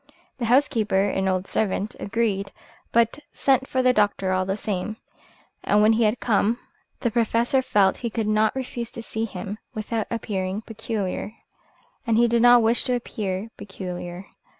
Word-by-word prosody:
The 240 - -1
housekeeper, 230 -6 +3
an 190 0 0
old 185 0 0
servant, 205 0 -1
agreed, 200 -2 -1 0.4
but 235 +4 +2
sent 265 -1 +2
for 260 -1 0
the 255 0 +5
doctor 205 -3 +1
all 185 0 +1
the 195 +1 -1
same; 210 +1 -3 0.7
and 205 - +3
when 220 +1 +6
he 225 0 +3
had 215 +3 +1
come 225 +1 +2 0.4
the 235 - 0
Professor 235 +3 +2
felt 200 -6 +3
he 235 - -3
could 225 0 -2
not 215 +2 +2
refuse 245 -3 -4
to 230 - -6
see 225 0 -3
him 205 0 -6 0.2
without 220 0 -2
appearing 200 -3 -3
peculiar. 215 -2 -4 0.7
And 225 -1 +3
he 240 +1 +5
did 235 0 +2
not 245 -1 +7
wish 230 +2 +2
to 250 -2 +1
appear 210 -3 -4
peculiar. 180 -2 -7
220 Hz, 165 wpm, -24 LUFS, 195-235 Hz, 0.7 s, not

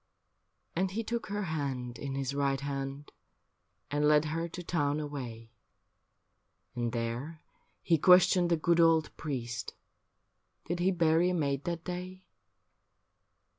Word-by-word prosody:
And 185 +2 +1
he 220 +4 -3
took 235 +1 -3
her 205 +1 -2
hand 135 -7 -3
in 140 -1 -4
his 135 0 -2
right 140 -1 +1
hand 140 +1 -5 0.8
And 145 +1 +2
led 150 0 +5
her 165 +2 -2
to 175 +1 -8
town 145 -4 0
away. 125 -7 -6 1.2
And 120 -2 -2
there 120 +7 -4 0.4
he 165 -3 +3
questioned 180 0 +6
the 170 - +3
good 170 +2 +2
old 165 -2 +4
priest, 120 -6 -4 0.9
Did 175 +1 -2
he 180 +2 +3
bury 170 0 +3
a 180 - 0
maid 140 -4 -1
that 170 -1 -3
day. 185 +1 -6
155 Hz, 135 wpm, -31 LUFS, 140-175 Hz, 1.2 s, questioned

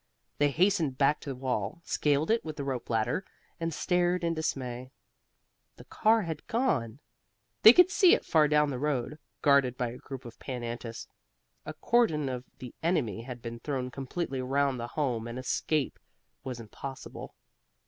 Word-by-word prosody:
They 145 0 +4
hastened 165 -3 +2
back 145 +2 +3
to - - -8
the 135 - -3
wall, 125 - -2
scaled 150 +4 +1
it 230 - +2
with 155 -1 -6
the 145 - -4
rope 130 -3 -4
ladder 120 - 0 0.4
and 165 0 -1
stared 180 +2 +1
in 170 0 +1
dismay. 130 -5 -3 0.9
The - - -13
car 220 0 +2
had 160 -3 -6
gone. 145 - 0 0.6
They 220 - +11
could 360 +7 +6
see 380 -3 +6
it - - -6
far 155 -2 +4
down 150 -1 +3
the 125 - -4
road, 145 0 -2 0.2
guarded 140 -4 +4
by 125 -1 -1
a 125 - -9
group 135 -2 -8
of 115 -1 -11
Pan 125 -3 -5
Antis. 115 -1 -6 0.6
A - - -5
cordon 160 - +2
of 125 0 -5
the 125 -2 -9
enemy 145 - 0
had 120 0 -8
been 115 0 -6
thrown 130 -1 -3
completely 135 +1 -3
round 135 0 +1
the 120 - -4
Home 120 -5 -2
and 120 +1 -6
escape 135 +2 -1 0.4
was 130 -2 -5
impossible. 130 +4 -8
135 Hz, 170 wpm, -29 LUFS, 125-160 Hz, 0.9 s, They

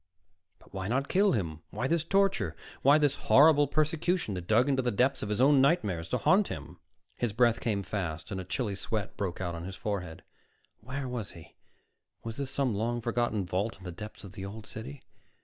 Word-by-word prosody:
But - - -22
why 95 -1 -3
not 135 +5 0
kill 200 +2 +4
him? 80 -8 -2
Why 120 +5 -2
this 165 +1 +1
torture? 195 - +1 0.3
Why 140 +3 +6
this 145 -2 +2
horrible 145 0 +7
persecution 155 - 0
that 90 -2 -6
dug 115 +5 +4
into 135 -2 +2
the 125 - 0
depths 130 +5 +1
of 105 - -4
his 105 - -1
own 135 +1 +6
nightmares 105 - +1
to - - +1
haunt 195 +2 +4
him? 80 +3 -8 0.4
His 120 -4 -1
breath 120 0 +3
came 105 -6 -1
fast 85 -5 -4
and 95 -1 -3
a - - -6
chilly 105 +3 -2
sweat 105 +1 -3
broke 95 -4 -3
out 90 -2 -2
on 85 0 -6
his 95 +1 -6
forehead. 90 -7 -4 0.6
Where 135 +1 -5
was 120 -5 -4
he? 85 -2 -14 0.7
Was 115 0 -6
this 140 -2 -3
some 130 -3 0
long 115 +4 -1
forgotten 115 -3 -1
vault 95 +5 -2
in 95 - -16
the 90 - -6
depths 105 +5 -9
of 95 - -9
the 95 -1 -8
Old 105 +2 -7
City? 130 +5 -8
110 Hz, 205 wpm, -30 LUFS, 95-140 Hz, 0.7 s, horrible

